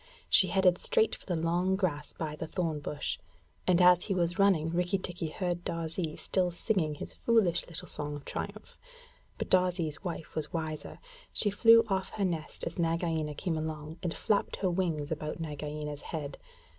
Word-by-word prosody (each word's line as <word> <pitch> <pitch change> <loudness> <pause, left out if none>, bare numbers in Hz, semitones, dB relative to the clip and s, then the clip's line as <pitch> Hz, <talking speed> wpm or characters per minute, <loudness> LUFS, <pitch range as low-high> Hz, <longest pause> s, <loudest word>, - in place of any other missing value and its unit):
She 190 - +7
headed 180 0 +3
straight 220 - +2
for - - -9
the 180 - 0
long 175 +3 +1
grass 160 -7 -1
by 155 -2 -4
the 160 - -5
thorn 165 -3 -1
bush, 145 0 -3 0.5
and 180 -1 +5
as 180 -1 +6
he 195 - -1
was 175 +1 0
running 175 -5 +4
Rikki 180 +3 +1
tikki 175 -3 -4
heard 175 +1 -2
Darzee 165 -1 -3
still 185 -2 0
singing 170 -3 0
his - - -5
foolish 220 -7 +2
little 165 - -7
song 150 0 -4
of 145 - -9
triumph. - - -6 0.6
But - - -4
Darzee's 180 -4 +2
wife 170 -3 -5
was 155 -1 -3
wiser. 160 -2 -4 0.3
She 205 - +4
flew 230 +2 +7
off 190 -2 -1
her 200 - 0
nest 165 -4 -3
as 165 +1 -4
Nagaina 165 -2 0
came 160 0 -1
along 155 +1 -5
and 175 -3 -1
flapped 205 +4 0
her 185 -2 0
wings 165 -5 -1
about 155 +1 -3
Nagaina's 150 -1 -5
head. 145 -4 -5
170 Hz, 175 wpm, -31 LUFS, 155-185 Hz, 0.6 s, She